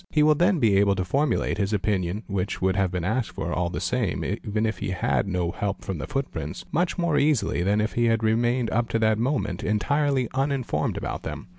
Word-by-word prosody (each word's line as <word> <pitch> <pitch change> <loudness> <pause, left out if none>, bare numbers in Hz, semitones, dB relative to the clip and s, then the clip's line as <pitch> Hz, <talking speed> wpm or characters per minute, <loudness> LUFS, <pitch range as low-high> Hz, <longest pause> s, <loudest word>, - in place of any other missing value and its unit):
He 150 - +3
will 155 0 +6
then 175 +5 +3
be 110 -8 +3
able 100 0 +4
to 95 -2 -2
formulate 140 +7 0
his 100 +1 0
opinion, 100 0 -1
which 100 -1 -2
would 95 0 +1
have 95 -2 +2
been 90 -1 -3
asked 110 +4 0
for - - -3
all 85 0 0
the 90 - -4
same - - -1
even 105 +1 -2
if 110 -3 -2
he - - -3
had 95 +1 0
no 90 -3 -1
help 100 0 -3
from 95 -5 -4
the - - -5
footprints, 135 - -4
| - - -26
much 175 +4 0
more 170 -5 +2
easily 140 - +2
than 100 +4 +2
if 110 +1 -1
he 120 - +2
had 115 -1 +2
remained 120 +2 +1
up 120 +1 0
to - - +1
that 110 -1 +2
moment 110 -8 -1
entirely 130 +6 +1
uninformed 135 -1 -1
about - - -4
them. - - -7
110 Hz, 230 wpm, -25 LUFS, 95-135 Hz, -, will